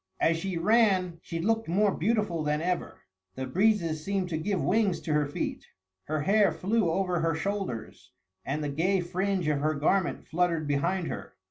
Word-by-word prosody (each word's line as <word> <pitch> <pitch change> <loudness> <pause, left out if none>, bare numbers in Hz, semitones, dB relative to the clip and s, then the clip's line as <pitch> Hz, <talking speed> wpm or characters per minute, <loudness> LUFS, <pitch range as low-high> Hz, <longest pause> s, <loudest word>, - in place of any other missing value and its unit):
As 165 - +3
she 185 +1 -3
ran 185 -3 +3
she 165 - -5
looked 225 +6 0
more 195 +4 +2
beautiful 210 -3 0
than 150 0 0
ever. 180 +2 -3 0.3
The 130 - -3
breezes 170 0 +1
seemed 195 -1 -1
to 160 - -1
give 190 +3 -1
wings 200 -1 +1
to 155 - -2
her 150 -1 +2
feet; 145 - -4 0.4
her 155 0 -1
hair 200 +3 +4
flew 190 +4 0
over 180 +1 0
her 165 -1 +1
shoulders, 180 - -4 0.3
and 150 +3 -2
the 145 - -2
gay 180 +6 +1
fringe 185 0 -1
of 150 -2 +1
her 155 +2 0
garment 170 +5 0
fluttered 165 -2 0
behind 170 +6 0
her. - - -6
175 Hz, 175 wpm, -28 LUFS, 155-195 Hz, 0.4 s, hair